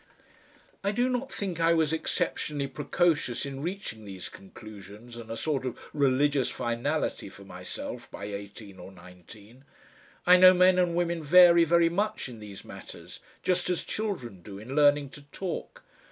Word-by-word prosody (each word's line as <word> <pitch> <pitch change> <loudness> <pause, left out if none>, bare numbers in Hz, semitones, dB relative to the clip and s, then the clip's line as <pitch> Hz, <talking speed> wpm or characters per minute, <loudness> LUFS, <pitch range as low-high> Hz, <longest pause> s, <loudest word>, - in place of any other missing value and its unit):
I 200 - +1
do 245 +4 +1
not 255 +2 -2
think 185 -5 -4
I 165 0 +4
was 160 -1 +1
exceptionally 150 -2 -1
precocious 145 -1 0
in 135 -1 -6
reaching 175 - -5
these 95 -3 -8
conclusions 105 +3 -12
and 115 -1 -10
a 115 - -4
sort 145 -1 -1
of 125 -2 -4 0.2
religious 140 -1 +2
finality 120 +1 -2
for 100 +1 -14
myself 90 -1 -7
by - - -8
eighteen 100 -1 -8
or 90 - -10
nineteen. 100 +7 -15 0.6
I 180 +1 +8
know 185 0 +8
men 185 0 +5
and 175 -2 +1
women 170 -1 0
vary 170 +2 +7
very 170 +1 +4
much 205 +3 -2
in 120 -3 -10
these 105 -2 -10
matters, - - -11 0.2
just 180 -1 +1
as 180 - -1
children 130 - -4
do 100 +1 -10
in 115 +7 -7
learning 145 -1 +4
to 145 - -12
talk. 180 +4 -6
145 Hz, 160 wpm, -28 LUFS, 110-175 Hz, 0.6 s, I